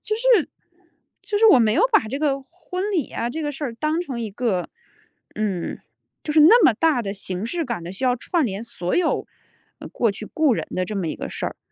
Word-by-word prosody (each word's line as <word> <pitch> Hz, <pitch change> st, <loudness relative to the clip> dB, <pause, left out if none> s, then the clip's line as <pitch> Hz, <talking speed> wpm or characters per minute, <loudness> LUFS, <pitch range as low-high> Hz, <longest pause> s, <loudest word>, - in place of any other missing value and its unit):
就 430 Hz, -, -2 dB
是 465 Hz, -7 st, +3 dB, 0.7 s
就 420 Hz, -, -2 dB
是 445 Hz, -, +6 dB
我 400 Hz, -11 st, +8 dB
没 220 Hz, -3 st, +3 dB
有 370 Hz, -, +3 dB
把 325 Hz, -, +4 dB
这 270 Hz, +5 st, -3 dB
个 285 Hz, -2 st, 0 dB
婚 365 Hz, +6 st, -5 dB
礼 330 Hz, -9 st, -1 dB
啊 235 Hz, -, -2 dB
这 315 Hz, +6 st, -4 dB
个 295 Hz, -, -1 dB
事 290 Hz, +2 st, -5 dB
儿 240 Hz, -4 st, -4 dB
当 305 Hz, +7 st, -1 dB
成 270 Hz, -9 st, -5 dB
一 220 Hz, -2 st, -4 dB
个， 200 Hz, -4 st, -1 dB, 0.7 s
嗯 200 Hz, -5 st, -2 dB, 0.4 s
就 300 Hz, -, -3 dB
是 310 Hz, -, +5 dB
那 430 Hz, +11 st, +8 dB
么 -, -, +7 dB
大 300 Hz, -1 st, +2 dB
的 195 Hz, -2 st, -3 dB
形 190 Hz, -1 st, -5 dB
式 330 Hz, +8 st, -2 dB
感 235 Hz, -, -4 dB
的 170 Hz, -, -7 dB
需 225 Hz, +7 st, -5 dB
要 250 Hz, -1 st, +3 dB
串 325 Hz, +4 st, 0 dB
联 200 Hz, 0 st, -4 dB
所 205 Hz, -7 st, -4 dB
有 355 Hz, -2 st, +1 dB, 0.7 s
过 230 Hz, -, +1 dB
去 215 Hz, +2 st, -8 dB
故 305 Hz, -1 st, +2 dB
人 -, -, -3 dB
的 185 Hz, -, -1 dB
这 210 Hz, -, -6 dB
么 180 Hz, -4 st, -2 dB
一 -, -, -4 dB
个 -, -, -5 dB
事 -, -, -4 dB
儿。 -, -, -6 dB
255 Hz, 250 characters per minute, -22 LUFS, 215-325 Hz, 0.7 s, 我